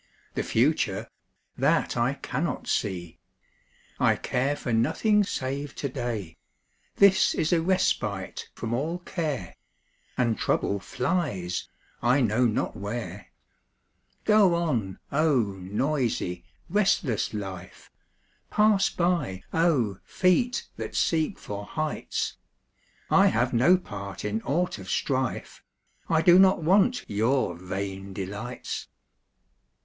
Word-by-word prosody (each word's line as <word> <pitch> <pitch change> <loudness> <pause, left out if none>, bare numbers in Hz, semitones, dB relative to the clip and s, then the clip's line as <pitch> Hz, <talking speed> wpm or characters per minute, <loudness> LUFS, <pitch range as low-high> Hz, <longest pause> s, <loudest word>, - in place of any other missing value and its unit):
The - - -1
future - - +1 0.5
that - - +2
I 120 +4 +1
cannot 145 +4 -3
see! 85 -5 -2 0.8
I - - +4
care 135 +3 -1
for 125 -4 -3
nothing 210 - +3
save 140 -4 -4
to 140 - -3
day 110 -10 -4 0.6
This 190 -1 +5
is 160 +2 +1
a 165 - +3
respite 115 - -1
from 115 0 -4
all 155 +8 -1
care, 155 - -4 0.6
And 120 -3 +1
trouble 100 - 0
flies 95 - -2 0.3
I 125 +4 +3
know 120 0 +3
not 110 - -1
where. 105 -2 -5 1.0
Go 210 -5 +5
on, 120 - -1
oh, 145 -4 +3 0.2
noisy, 105 - -1 0.2
restless 170 - +1
life! 95 -4 -7 0.6
Pass 210 -2 +4
by, 170 - -1
oh, 140 - +2
feet 220 +7 +1
that - - -5
seek 160 +3 +1
for 100 0 -6
heights! 155 +8 -3 0.7
I - - +6
have 120 +3 +1
no 130 +11 +5
part 100 - -7
in 105 +2 -1
aught 165 - -1
of 95 -1 -9
strife; 130 -2 -2 0.5
I 160 -1 +3
do 180 +1 +7
not 190 -3 +5
want 205 +9 +3
your 110 -1 +1
vain 95 +2 -5
delights. 100 +6 -5
125 Hz, 115 wpm, -27 LUFS, 100-170 Hz, 1.0 s, do